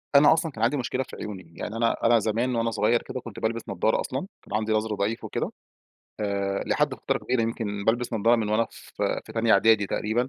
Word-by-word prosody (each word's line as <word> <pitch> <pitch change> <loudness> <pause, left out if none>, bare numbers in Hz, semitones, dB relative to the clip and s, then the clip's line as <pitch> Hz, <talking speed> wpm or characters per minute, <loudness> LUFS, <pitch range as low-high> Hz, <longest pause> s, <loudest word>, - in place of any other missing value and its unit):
أنا 145 +3 +8
أصلًا 160 0 -1
كان - - -4
عندي 130 +5 +3
مشكلة 130 +1 -1
في - - -11
عيوني، 95 -6 -8
يعني 105 - -5
أنا 115 0 +2
أنا 115 0 +6
زمان 115 +4 0
وأنا 115 0 +1
صغيّر 115 +2 +2
كده 130 - -6
كنت 115 -4 -9
بالبس 115 +1 -1
نضارة 100 +3 +1
أصلًا، 130 - -3 0.3
كان - - -9
عندي 110 0 -2
نظري 110 0 0
ضعيف 105 +3 -1
وكده، - - -3 0.7
آآ، 100 -1 -1
لحد - - +1
فترة - - -1
كبيرة 125 -2 0
يمكن 105 -3 -3
بالبس 120 +2 +1
نضارة 115 +2 +4
من 110 -2 -1
وأنا 110 +2 +2
ف - - -9
في - - -2
تانية 115 0 +3
إعدادي 105 0 +5
تقريبًا، 115 +6 0
115 Hz, 215 wpm, -26 LUFS, 105-120 Hz, 0.7 s, أنا